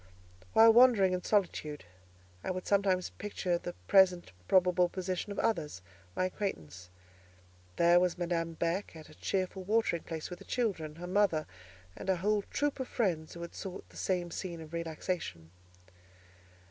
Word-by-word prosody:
While 225 0 +8
wandering 230 -6 +6
in 180 -1 -2
solitude, 155 - -1 0.6
I - - -3
would 185 0 -3
sometimes 195 -2 +1
picture 185 -4 -2
the 175 - -6
present 185 - +4 0.2
probable 180 -1 +4
position 185 +2 -3
of 200 - -6
others, 150 - -1 0.3
my 185 - +1
acquaintance. 90 - -5 0.9
There 170 +1 +5
was 180 -1 +1
Madame 170 -1 -1
Beck 170 +3 -2
at 160 -1 -11
a - - -14
cheerful 190 +3 -2
watering 210 -4 +1
place 160 +1 -6
with 180 - -7
her - - -13
children, 185 -11 -2
her 175 +2 -7
mother, 180 -4 +2 0.5
and - - -6
a 190 - +4
whole 205 +4 +1
troop 290 -1 -1
of 260 - -3
friends 170 -10 -1
who 170 - -6
had 170 - -8
sought 190 -1 -7
the - - -19
same 180 -2 -1
scene 170 -1 -5
of 160 0 -11
relaxation. 165 - -4
180 Hz, 160 wpm, -32 LUFS, 165-195 Hz, 0.9 s, While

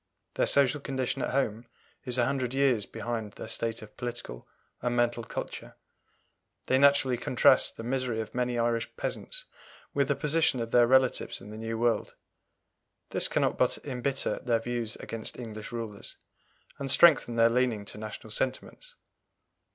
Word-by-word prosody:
Their - - +1
social 140 +1 +3
condition 130 -2 -2
at - - -1
home 120 -3 -1 0.4
is 125 -1 0
a 120 - +3
hundred 130 -2 -1
years 130 -7 +2
behind 110 -3 -4
their - - -8
state 115 0 -3
of 105 - -14
political 120 - -6 0.3
and 120 0 -1
mental 120 -1 +1
culture. - - -6 0.9
They 130 - +3
naturally 140 -3 +4
contrast - - +3
the 115 - -6
misery 125 -2 -1
of 110 - -5
many 125 -1 -1
Irish 115 -1 0
peasants - - -4 0.5
with 140 -1 +2
the 145 - +1
position 150 0 +2
of 115 -1 -4
their 120 -1 +5
relatives 130 0 +2
in 105 - -11
the - - -8
New 115 0 -4
World. 120 0 0 1.0
This - - +3
cannot - - 0
but - - +3
embitter 135 0 -1
their 120 -2 +1
views 120 -1 -3
against 115 -1 -5
English 110 -3 -7
rulers, 115 -4 -6 0.6
and 140 -1 -3
strengthen 140 -6 +6
their 115 0 +6
leaning 120 -4 +1
to 105 - -9
national 110 0 -8
sentiments. 130 - -4
120 Hz, 160 wpm, -29 LUFS, 115-130 Hz, 1.0 s, strengthen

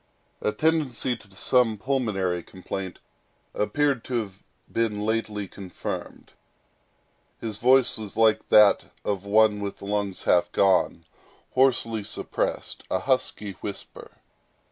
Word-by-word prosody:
A - - +1
tendency 150 -5 +1
to 100 - -17
some 115 +1 +2
pulmonary 100 -8 -1
complaint 95 +1 -6 0.6
appeared 135 +4 +1
to 125 - -3
have 100 -5 -3 0.3
been 105 -2 0
lately 110 -2 -1
confirmed. 95 -1 -7 1.1
His 110 -2 -5
voice 130 0 +4
was 105 -1 -7
like 110 -1 +3
that 105 -1 +6 0.2
of 100 -1 -2
one 105 0 +4
with 100 -1 -5
lungs 100 -1 -2
half 90 - +3
gone—hoarsely 115 +4 +1
suppressed, - - -3
a - - +1
husky 130 -5 -1
whisper. 100 -1 -8
105 Hz, 110 wpm, -25 LUFS, 100-120 Hz, 1.1 s, that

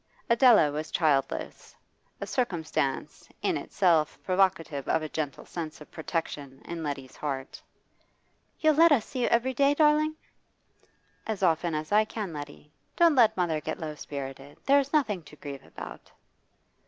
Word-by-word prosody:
Adela 235 - +6
was 155 +2 -4
childless 140 -5 -1 0.4
a - - -4
circumstance 160 - -2
in - - +1
itself 165 -5 +1
provocative 185 -7 +1
of 160 - +1
a 155 - -4
gentle 150 -3 -4
sense 160 -3 -6
of 150 - -14
protection 150 -4 -4
in 170 -1 -5
Letty's 140 -4 -5
heart. 135 -3 -5 1.0
'You'll 310 -1 +4
let 330 +2 +6
us 245 -7 +4
see 255 - -5
you - - +2
every 245 +3 +2
day, 280 +3 +3
darling?' 305 0 +3 1.1
'As 215 -3 -3
often 165 -1 +2
as 155 +3 -4
I 210 +1 +5
can, 210 -5 -5
Letty. 145 0 -9 0.2
Don't 340 -2 +5
let 240 -8 +4
mother 165 -4 0
get - - -4
low 155 -3 -4
spirited. 140 -1 -8
There's 280 0 +4
nothing 225 - +1
to 150 -1 -15
grieve 140 -2 -8
about. - - -10
165 Hz, 150 wpm, -28 LUFS, 150-235 Hz, 1.1 s, Adela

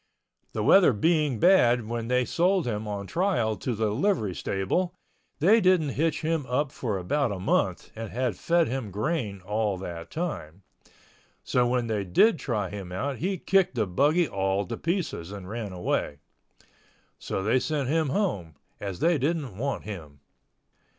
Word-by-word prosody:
The - - -1
weather 185 -9 +6
being 150 +2 +2
bad 120 - +4
when 115 0 -3
they 125 0 +2
sold 180 +4 +2
him 110 -2 -3
on 100 -1 -4
trial 165 - 0
to 120 +4 -3
the 110 -1 0
livery 120 - 0
stable 175 - -1 0.4
they 210 +9 +5
didn't 180 -6 +3
hitch 155 +3 0
him 160 -1 0
up 135 +3 0
for 110 -8 -3
about 120 +8 0
a 100 - -3
month 90 - 0
and 115 -1 -6
had 125 -3 -1
fed 170 - +2
him 125 -3 -3
grain 105 - -2
all 105 +1 -1
that 85 -3 -7
time. 100 - -5 0.8
So 125 -1 +2
when 125 -1 +1
they 110 -3 -1
did 160 - +4
try 105 -7 -2
him 95 -3 -7
out 130 +9 -2
he 190 +6 -1
kicked 190 -5 +2
the 110 -3 +1
buggy 150 - +2
all 95 -2 0
to - - -4
pieces 165 - -3
and 100 -3 -8
ran 110 -1 -5
away. 90 -5 -2 1.0
So 95 - -3
they 115 +6 +3
sent 145 -2 -1
him 155 +1 +1
home, 105 - -1 0.2
as 100 -3 -5
they 170 -2 +3
didn't 145 - -1
want 135 +7 -3
him. 80 -9 -9
120 Hz, 165 wpm, -27 LUFS, 100-160 Hz, 1.0 s, weather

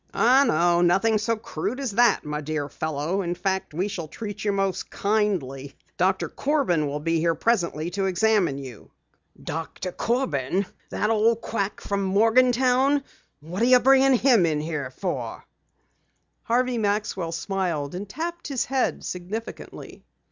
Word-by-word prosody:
"Oh, 255 +4 +5
no, 170 +2 +3
nothing 195 +5 +3
so 230 +2 0
crude 215 - -4
as 270 -5 -2
that, 235 -2 +3
my 150 0 -3
dear 150 -1 -3
fellow. 155 +5 -2
In 175 -1 -2
fact, 190 -1 -2
we 175 +6 -1
shall 180 -6 -5
treat 205 +4 -7
you 205 - +1
most 195 -1 -1
kindly. 185 -11 -1 0.2
Doctor 185 +1 +1
Corbin 265 - 0
will 145 +1 -3
be 165 +2 0
here 165 0 +1
presently 175 -7 0
to 195 +1 -1
examine 190 -5 +2
you." 130 -6 -10 0.5
"Doctor 165 +3 -5
Corbin! 190 - -1 0.2
That 210 - 0
old 225 +1 +2
quack 200 -3 -3
from 200 0 -2
Morgantown! 250 +7 +3 0.4
What 175 +7 -5
are - - +4
you 250 0 +6
bringing 270 +1 +5
him 240 -5 +4
here 150 -3 -1
for?" 130 - -5 1.0
Harvey 245 +1 +1
Maxwell 205 -5 -1
smiled 170 -4 -2
and 195 +3 -6
tapped 340 +7 -5
his 275 -4 -1
head 265 -1 -1
significantly. 190 +6 -7
195 Hz, 145 wpm, -25 LUFS, 165-230 Hz, 1.0 s, you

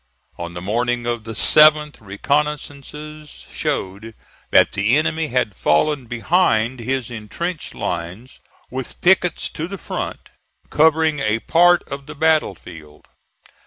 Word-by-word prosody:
On 85 0 -6
the 90 - -7
morning 120 +4 -1
of 120 -2 -3
the 115 - -6
7th, 150 +5 +5
reconnoissances 150 +6 -4
showed 105 +4 -4 0.3
that - - +4
the 105 +7 +2
enemy 155 +1 0
had 125 -6 -1
fallen 130 - +1
behind 120 -2 +1
his 125 0 -3
intrenched 155 +10 -5
lines, 90 +9 -5 0.3
with 130 -1 -6
pickets 180 -1 +2
to 160 +1 -5
the 195 +2 -7
front, - - -6 0.4
covering 160 -1 +3
a 110 -4 0
part 175 +8 +3
of 140 0 -8
the 150 - -9
battle 155 -8 +2
field. 75 -3 -14
130 Hz, 125 wpm, -20 LUFS, 110-155 Hz, 0.4 s, 7th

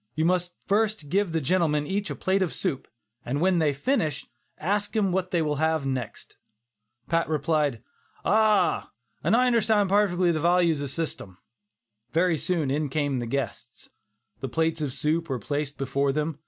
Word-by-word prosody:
You 160 +1 +1
must 180 0 0
first 210 -6 0
give 195 +1 +1
the 160 - 0
gentlemen 150 -1 +1
each 200 +5 -2
a - - -3
plate 190 +1 0
of 185 - -1
soup, 135 - -2 0.4
and 135 +4 -2
when 180 +1 +3
they 155 -2 +3
finish 150 - -1 0.3
that, - - -11
ask 205 +2 0
them 205 -4 +1
what 185 0 -1
they 175 -4 +1
will 150 -1 -1
have 160 -1 +1
next." 130 -4 -5 0.7
Pat 165 -1 +1
replied, 150 -5 0 0.4
"Ah! 210 -3 +3 0.3
an' - - +3
I 250 +2 +4
understand 220 -4 +3
parfectly 185 -4 +3
the 155 - -1
vartues 170 -2 +3
of 140 - -3
shystem." 140 - -4 0.8
Very 165 -1 +2
soon 165 -6 0
in 150 +1 0
came 145 -2 -1
the 120 - -4
guests. 125 -1 -5 0.5
The 135 - -4
plates 160 +2 0
of 145 -3 -1
soup 160 +5 -1
were 130 - -1
placed 145 +4 -3
before 140 0 0
them. 150 +1 -2
160 Hz, 175 wpm, -26 LUFS, 145-185 Hz, 0.8 s, I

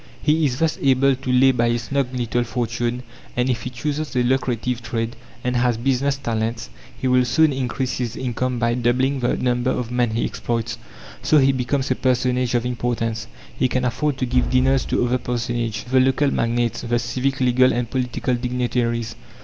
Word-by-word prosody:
He 155 +1 +2
is 125 -2 -3
thus 160 +1 0
able 135 0 +4
to 130 0 -4
lay 130 +1 +5
by 120 -2 +1
a 120 0 +1
snug 140 +3 -1
little 120 0 0
fortune; 120 +1 -2 0.3
and 125 +1 +2
if 115 -2 -2
he - - -4
chooses 145 +4 -3
a 125 - +3
lucrative 125 -1 0
trade, 115 +1 -3 0.3
and 125 0 -1
has 120 -1 +2
"business 135 +3 +1
talents," 115 - -3 0.3
he 130 - -1
will 125 0 +4
soon 155 +4 +3
increase 130 0 -2
his 120 -3 -2
income 125 0 -2
by 115 0 +1
doubling 125 +3 +1
the 120 -1 +1
number 125 0 0
of 120 -2 -2
men 125 -1 +1
he 115 - +1
exploits. 115 0 -3 0.4
So 155 - +3
he 135 -1 +5
becomes 130 +1 -1
a - - +3
personage 125 -1 +1
of 120 0 +1
importance. 120 -2 -2 0.3
He 130 - +2
can 125 0 -1
afford 135 +3 0
to 130 - -1
give 125 +1 +1
dinners 130 +1 +2
to - - +1
other 125 +1 +1
personages 120 -2 -2
to 120 - -13
the 130 - +5
local 135 +2 +3
magnates, 120 0 0
the 120 0 0
civic, 130 +3 -1
legal, 130 0 +4
and 120 0 -1
political 125 +1 -1
dignitaries. 120 -1 -1
125 Hz, 190 wpm, -22 LUFS, 120-130 Hz, 0.4 s, lay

